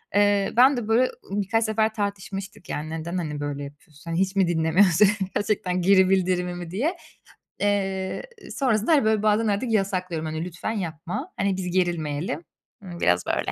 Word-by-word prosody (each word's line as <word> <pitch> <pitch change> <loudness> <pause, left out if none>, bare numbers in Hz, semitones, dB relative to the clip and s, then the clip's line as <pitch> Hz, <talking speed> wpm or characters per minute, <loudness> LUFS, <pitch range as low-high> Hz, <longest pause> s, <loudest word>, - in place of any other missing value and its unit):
Eee, 205 -1 +3
ben 260 +2 +6
de 225 -3 -3
böyle 240 +3 +3 0.2
birkaç 205 +3 +1
sefer 220 0 +1
tartışmıştık 200 -2 -5
yani, 150 +1 -4
neden, 165 +3 -4
hani, 150 -4 -3
böyle 145 -1 -4
yapıyorsun, 150 +3 -11
hani, 165 - 0
hiç 190 +1 0
mi 190 - +4
dinlemiyorsun, 175 +4 +4 0.3
gerçekten 185 -3 0
geri 190 0 +5
bildirimimi 180 -2 0
diye. 290 - -1 0.6
Eee, 195 -2 -1 0.3
sonrasında, 235 -1 +1
hani, 285 - +4
böyle 220 -1 +2
bazen 215 +1 +3
artık 210 +4 0
yasaklıyorum, 185 -6 -1
hani, 155 +1 -3
lütfen 180 +4 -4
yapma. 180 - -5
Hani, 195 -1 0
biz 180 -2 -3
gerilmeyelim. 170 -3 -1 0.4
Imm, 175 -3 -8
biraz 90 0 +2
böyle. - - -1
190 Hz, 160 wpm, -24 LUFS, 170-210 Hz, 0.6 s, ben